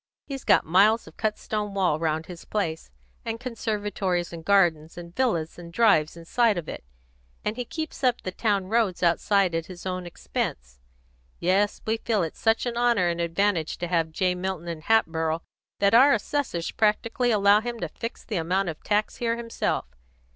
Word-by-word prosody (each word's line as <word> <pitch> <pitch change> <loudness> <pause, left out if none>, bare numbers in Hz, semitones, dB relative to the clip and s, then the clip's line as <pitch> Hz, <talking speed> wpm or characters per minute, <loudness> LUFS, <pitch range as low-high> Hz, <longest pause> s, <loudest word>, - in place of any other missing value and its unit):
He's 270 -2 -6
got - - +4
miles 205 +7 +4
of 160 - -14
cut 215 -1 -1
stone 210 -2 -3
wall 180 -6 +2
round 160 0 -1
his 175 0 -10
place, 165 -7 -3 0.3
and 230 0 -4
conservatories 210 -7 -2
and 165 -1 -8
gardens 170 -5 +2
and 170 0 -9
villas 175 -12 0
and 170 -1 -10
drives 170 -7 +3
inside 210 +5 +1
of 165 -3 -4
it, - - -7 0.6
and 210 - -1
he 245 0 -4
keeps 315 +1 -6
up 250 -2 +3
the 185 - -4
town 200 -1 0
roads 205 -3 0
outside 185 +2 +3
at 165 0 -2
his 180 -1 -10
own 185 -1 -3
expense. 60 - -4 0.6
Yes, 195 +4 +1
we 220 +1 0
feel 220 -4 0
it 160 - -4
such 225 +1 +1
an 240 -1 -3
honour 235 -7 +3
and 170 0 -2
advantage 170 -1 0
to 175 - -3
have 165 -2 +1
J. 180 +3 0
Milton 180 -1 -4
in 165 -2 -5
Hatboro' 165 -5 +1 0.3
that 200 +1 +3
our 270 +5 +7
assessors 230 - -2
practically 225 +3 +1
allow 205 -1 +5
him 240 0 -5
to 170 - -2
fix 230 +9 -7
the 215 - -3
amount 180 +3 0
of 160 - -7
tax 210 0 0
here 230 -1 0
himself. 230 -1 -2
195 Hz, 185 wpm, -26 LUFS, 170-225 Hz, 0.6 s, our